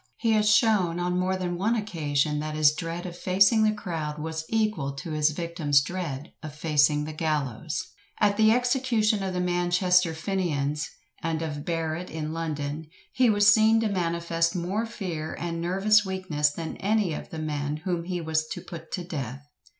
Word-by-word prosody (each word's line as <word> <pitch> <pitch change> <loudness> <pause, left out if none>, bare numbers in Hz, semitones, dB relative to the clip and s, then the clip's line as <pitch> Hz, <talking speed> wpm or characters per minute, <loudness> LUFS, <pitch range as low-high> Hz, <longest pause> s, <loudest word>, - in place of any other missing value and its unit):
He 230 - +1
has 215 -1 +3
shown, 210 -6 +3
on 180 0 0
more 185 +1 0
than 175 -1 -3
one 220 +5 +2
occasion, 150 -8 0
that 155 0 -4
his 155 -1 +5
dread 165 +2 -5
of 175 -1 -6
facing 195 +5 +4
the 215 0 +4
crowd 165 -8 -4
was 160 +1 -4
equal 215 -11 0
to 140 +4 -7
his 155 0 +2
victim's 155 -3 +1
dread 155 -2 -5
of 155 -2 -8
facing 150 -1 +2
the 155 +1 -5
gallows. 150 -3 -2 0.3
At 205 -1 +3
the 220 +1 +5
execution 245 -4 +2
of 190 -1 -3
the - - 0
Manchester 180 -1 +2
Fenians, 160 -4 -1 0.3
and 165 0 -2
of 145 -2 -5
Barrett 165 +1 -2
in 155 0 -4
London, 155 -1 -4 0.3
he 255 -2 +4
was 205 0 +6
seen 220 0 +5
to 220 - +1
manifest 170 -2 0
more 190 +6 -1
fear 175 -9 -5
and 165 -1 -3
nervous 195 +4 +3
weakness 185 -6 0
than 160 +2 -6
any 205 -4 +1
of - - -6
the 160 - -7
men 150 -1 -2
whom 175 -3 -1
he 180 0 -2
was 155 -1 0
to - - -5
put 165 -2 -10
to 180 - -2
death. 140 -5 -6
170 Hz, 180 wpm, -26 LUFS, 155-195 Hz, 0.3 s, was